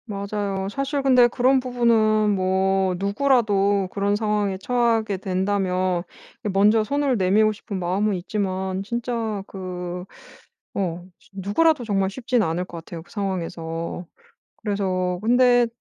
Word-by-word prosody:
맞아요. 200 -2 -3
사실 275 +5 -2
근데 250 -3 +6
그런 255 +2 +3
부분은 225 -4 +2
뭐 190 0 +1
누구라도 200 -2 +2
그런 200 0 0
상황에 210 -2 0
처하게 225 -1 +1
된다면 185 -1 0 0.4
이 210 - -1
먼저 210 +3 +4
손을 280 +2 0
내밀고 205 +3 +3
싶은 205 -2 -6
마음은 190 +4 0
있지만 190 0 -2
진짜 230 -2 -3
그 180 -1 -6 0.7
어 175 -3 -2 0.2
쉬 - - -25
누구라도 245 - +2
정말 195 -3 +1
쉽진 245 +1 0
않을 175 0 -1
것 170 - -8
같아요. 165 0 -9
그 175 - -22
상황에서. 170 -4 -4 0.6
그래서 185 -3 -1
근데 245 +1 +4
200 Hz, 275 characters per minute, -23 LUFS, 185-230 Hz, 0.7 s, 근데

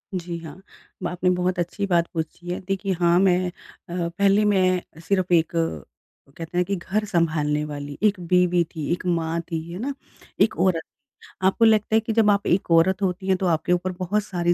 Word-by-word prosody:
जी 170 -1 -4
हाँ 165 +3 -11 0.5
आपने 180 +1 0
बहुत 180 0 0
अच्छी 175 +4 -2
बात 170 -2 +2
पूछी 165 +2 -5
है। 180 - -2
देखिए 195 0 -1
हाँ 175 0 +4
मैं 185 -1 +3
अ, 175 -1 -7
पहले 200 +1 +4
मैं 185 -5 +1
सिर्फ़ 185 -2 +1
एक, 165 -1 +3 0.9
कहते 165 +2 -6
हैं 180 - +4
कि 200 - -1
घर 200 +4 -2
सँभालने 160 -6 0
वाली 145 -1 -7
एक 205 -3 +3
बीवी 180 0 +2
थी, 155 0 -3
एक 180 - -2
माँ 165 -2 0
थी, 165 -1 -4
है 180 - -6
ना? 275 +4 -2 0.5
एक 220 +2 +3
औरत 180 -4 +2
थी। 275 - -24 0.2
आपको 225 +4 +3
लगता 220 0 +3
है - - +6
कि 225 0 -3
जब 220 -2 +4
आप 200 0 0
एक 180 -1 +1
औरत 185 +4 +4
होती 190 0 -2
हैं, 190 -1 +3
तो 185 - -2
आपके 165 +1 0
ऊपर 185 +1 -1
बहुत 200 +3 0
सारी 175 -3 0
180 Hz, 200 wpm, -23 LUFS, 170-195 Hz, 0.9 s, है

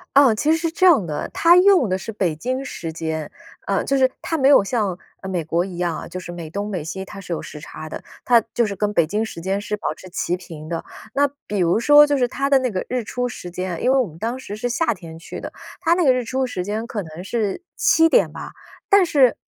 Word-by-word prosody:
啊， 275 -5 +7
其 290 +8 -1
实 320 - +4
是 330 0 -2
这 370 +3 +2
样 300 - +6
的， 150 -3 -4
它 345 +1 +6
用 365 - +5
的 185 - +1
是 190 - -9
北 185 -6 0
京 255 +8 -2
时 165 -10 -6
间， 160 -2 -4 0.4
呃， 195 - +1
就 275 - +1
是 260 -1 +4
它 325 - -2
没 270 - +3
有 275 -8 +7
像， 200 -5 -1 0.2
啊， 190 - -8
美 180 -4 -2
国 170 +3 0
一 185 - -8
样 175 -2 -1
啊， - - -7
就 185 +2 -6
是 175 - -8
美 170 -3 -7
东 200 +4 -4
美 185 -6 -3
西 190 +5 -5
它 195 +1 -10
是 185 -3 -5
有 - - -3
时 150 - -9
差 155 +1 -9
的， - - -6 0.2
它 240 -1 +5
就 235 - +2
是 200 -2 -4
跟 210 0 0
北 170 - +4
京 210 +7 -1
时 170 - -8
间 195 +3 -1
是 210 +1 -3
保 205 - -3
持 185 - -13
齐 180 0 -2
平 155 -3 -10
的。 165 -1 -4 0.3
那 285 +1 +3 0.2
比 205 - -3
如 175 +3 +3
说 295 +1 +7
就 290 -1 +1
是 250 - +3
它 275 +1 -1
的 275 - +6
那 255 -3 -1
个 185 - -3
日 250 -1 -2
出 245 +3 -2
时 180 -7 -8
间， 180 -1 -4
因 255 - +4
为 270 - +4
我 245 - +1
们 160 0 -13
当 235 +7 -3
时 205 -5 -7
是 245 +3 -3
夏 245 +1 +1
天 165 -4 -11
去 165 - -8
的， - - -6 0.3
它 340 -1 +3
那 355 - +1
个 260 - +6
日 250 -1 -1
出 260 +3 -1
时 180 -7 -4
间 215 +4 -3
可 210 -3 -4
能 160 +1 -9
是 210 - -2
7 325 0 +4
点 - - +3
吧， - - -8 0.3
但 400 -2 +6
是， 275 -7 +4
210 Hz, 285 characters per minute, -21 LUFS, 175-265 Hz, 0.4 s, 啊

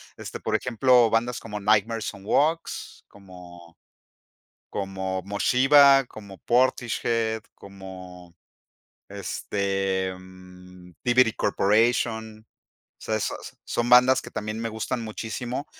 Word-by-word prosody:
Este, - - -8
por - - -2
ejemplo, 125 0 +3
bandas 120 +2 0
como 105 -2 -7
Nightmare 110 +2 +1
Sun 100 -2 -6
Walks, 160 +9 -1
como 90 -3 -15 1.0
como 95 -1 -4
Moshiba, 135 +7 +5
como 100 -4 -12
Portishhead, 115 -2 0
como 95 -3 -12 0.7
este, 95 -1 -2
mm,Thievery 90 +5 -2
Corporation. 110 +1 0 0.5
O - - -13
sea, 110 - -1
esas 110 - -5
son 120 0 -2
bandas 125 +2 +6
que - - -10
también 110 +1 -5
me 115 - -2
gustan 115 +2 -4
muchísimo 120 +4 -5
110 Hz, 105 wpm, -25 LUFS, 95-120 Hz, 1.0 s, bandas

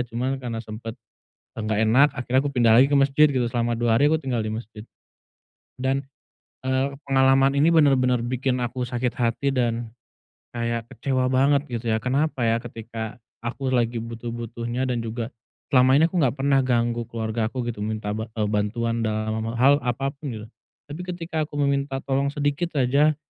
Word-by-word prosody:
Cuman, 125 +3 -2
karena 115 -3 -4
sempet, 110 +1 -7 0.6
eee, - - -3
nggak 110 -1 0
enak, 130 +7 +5
akhirnya 125 +1 0
aku 145 - -2
pindah 115 -2 +4
lagi 135 - +6
ke 145 - +4
mesjid, 140 +2 +5
gitu. 125 -3 0
Selama 120 -1 0
2 115 -1 +2
hari, 145 +1 +4
aku 160 - +3
tinggal 125 -4 -1
di 110 - -3
mesjid. 110 -1 -8 1.0
Dan, 135 +1 0 0.6
eee, 130 +1 +1 0.2
pengalaman 135 0 +4
ini 155 +4 +5
benar-benar 130 -6 +4
bikin 130 +1 -1
aku 125 +1 -3
sakit 120 0 -2
hati, 125 +3 0
dan, 115 -2 -1 0.6
kayak 115 -1 -2
kecewa 130 -1 -1
banget, 140 +2 +3
gitu 120 -1 -3
ya. 110 - +2
Kenapa 135 -1 0
ya, 115 0 +3
ketika 115 -1 -7 0.3
aku 130 +2 -3
lagi 120 -1 +1
butuh-butuhnya, 120 +1 -4
dan 120 -2 -1
juga, 115 +1 -4 0.4
selama 130 +1 +6
ini 160 - +5
aku 180 - -3
nggak 130 -1 +2
pernah 135 0 +3
ganggu 120 -1 +1
keluargaku, 115 +2 -2
gitu. 105 -3 -6
Minta 110 -1 -3
ba 110 0 -5
eee, 105 - +1
bantuan 115 +3 -1
dalam, 110 0 -1
eee, 115 - -4
hal 140 +2 +6
apa 125 +3 -1
pun, 145 +1 -9
gitu. 110 -1 -7 0.4
Tapi 150 +5 -7
ketika 165 -3 -3
aku 145 - -12
meminta 140 -1 0
tolong 140 +1 0
sedikit 145 +4 -1
aja, 140 +4 +3
125 Hz, 175 wpm, -24 LUFS, 115-135 Hz, 1.0 s, lagi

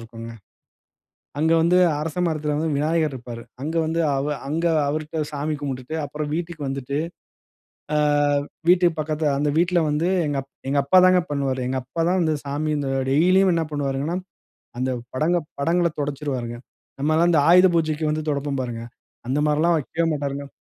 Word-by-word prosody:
இருக்கும்ங்க. 115 0 -9 1.1
அங்க 160 +2 +3
வந்து 170 +2 +3 0.2
அரசமரத்துல 155 -1 -1
வந்து 160 +1 -1
விநாயகர் 155 +1 +1
இருப்பாரு. 120 -2 -8 0.2
அங்க 155 +3 -3
வந்து 165 +1 -1
அவ 135 +1 -1 0.2
அங்க 160 +4 -1 0.2
அவருட்ட 155 +2 -3
சாமி 150 +1 -2
கும்பிட்டுட்டு 135 0 -5
அப்புறம் 150 +1 -4
வீட்டுக்கு 170 -2 -4
வந்துட்டு, 135 0 -4 1.0
ஆ - - +3 0.7
வீட்டுக்கு 175 -2 +4
பக்கத்துல 155 0 0
அந்த 145 0 +1
வீட்டுல 175 +1 +3
வந்து 150 +3 0 0.2
எங்க 145 -1 -1
அப் 135 - -32 0.2
எங்க 140 +1 +2
அப்பா 165 +7 +5
தான் 185 0 +5
பண்ணுவாரு. 135 -2 -1
எங்க 130 +1 -1
அப்பா 150 +6 -4
தான் 185 +1 +2
வந்து 160 -2 +1
சாமி 145 +2 -2
இந்த 140 -2 -2 0.2
டெய்லியும் 185 +5 +4
என்ன 165 -1 0
பண்ணுவாருங்கனா, 145 +3 -2 0.6
அந்த 130 +1 0 0.2
படங்கள் 160 +3 +1
படங்களைத் 170 +2 +1
துடைச்சுருவாருங்க. 135 -5 -3 0.4
நம்ம 150 +3 +1
எல்லாம் 170 +2 +4
இந்த 155 - +5
ஆயுத 180 +2 +8
பூஜைக்கு 155 -1 0
வந்து 155 0 -2
துடைப்போம் 140 -1 -2
பாருங்க, 115 -2 -5 0.4
அந்த 135 +3 0
மாரில்லாம் 160 +3 +3
வைக்கவே 165 +3 -2
மாட்டாருங்க. 140 -1 -4
150 Hz, 155 wpm, -23 LUFS, 140-165 Hz, 1.1 s, ஆயுத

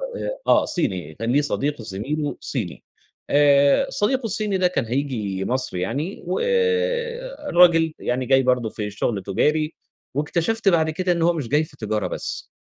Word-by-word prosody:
آآ، - - -4
آه - - +5
صيني، 95 - -2
كان 115 +2 -2
ليه 145 +3 +4
صديق 145 -2 -1
زميله 140 +9 -3
صيني، 110 - -4 0.5
آآ، 145 - +4
صديقه 255 +3 0
الصيني 210 -2 -1
ده 185 -1 +3
كان 155 -9 -1
هييجي 110 -7 -2
مصر 125 -7 -1
يعني، 140 - -3
والراجل 470 - +2
يعني 125 +1 -1
جاي 135 0 +4
برضو 125 -3 +1
في 105 -1 -4
الشغل 105 0 -2
تجاري، 150 - +1 0.4
واكتشفت 175 +9 +1
بعد 160 -3 +2
كده 180 +3 -1
إن 170 - 0
هو 170 +1 +4
مش 145 -8 -4
جاي 150 +4 +2
في 145 -2 -10
تجارة 105 -3 -2
بس، - - -4
150 Hz, 155 wpm, -22 LUFS, 120-185 Hz, 0.5 s, آه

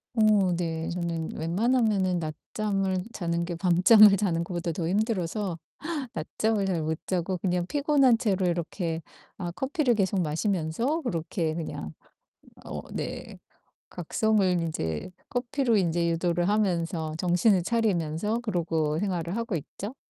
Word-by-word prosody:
어 210 -5 +4
네 165 -2 -2
저는 170 -2 -3
웬만하면은 195 +1 +1
낮잠을 190 +4 -2
자는 170 -1 -1
게 175 -1 -4
밤잠을 195 +4 +7
자는 175 -4 0
것보다 175 0 -3
더 165 0 -3
힘들어서 195 -2 -1 0.5
낮잠을 205 +6 -1
잘 180 -4 0
못 160 +1 -1
자고 185 0 -1
그냥 180 -1 0
피곤한 280 -2 +3
채로 200 -6 +1
이렇게 170 -1 -2 0.3
아 175 -3 -4
커피를 265 - 0
계속 195 -1 +1
마시면서 180 - -1
그렇게 165 - -2
그냥 155 - -5 0.7
어 - - -5
네. - - -5 0.5
각성을 215 +5 +1 0.2
인제 80 - -3 0.2
커피로 245 -1 +1
인제 170 -2 +1
유도를 175 +1 +1
하면서 170 -6 0
정신을 180 +3 +3
차리면서 210 -1 0
그러고 165 -8 -1
생활을 175 -2 -2
하고 230 -4 -2
있죠. 200 - -6
180 Hz, 285 characters per minute, -27 LUFS, 165-215 Hz, 0.7 s, 밤잠을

